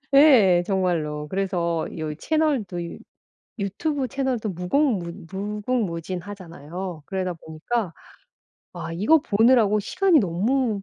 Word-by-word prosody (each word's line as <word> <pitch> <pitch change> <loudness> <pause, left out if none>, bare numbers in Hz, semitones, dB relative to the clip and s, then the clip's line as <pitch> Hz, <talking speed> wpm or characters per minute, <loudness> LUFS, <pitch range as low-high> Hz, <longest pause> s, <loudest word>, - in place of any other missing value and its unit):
예 225 - +7
정말로. 165 -6 -1
그래서 175 -3 -1
여기 155 -1 -3
채널도 275 - 0
유 170 - -7 0.6
유튜브 260 - -2
채널도 255 -4 -2
무궁무 180 - -1
무궁무진 200 -3 -2
하잖아요. 175 -3 -8
그러다 185 -2 -2
보니까 165 +5 -4 0.8
아 165 - -5
이거 215 - +4
보느라고 220 -1 +4
시간이 370 - +3
너무 210 +4 0
195 Hz, 265 characters per minute, -24 LUFS, 170-245 Hz, 0.8 s, 예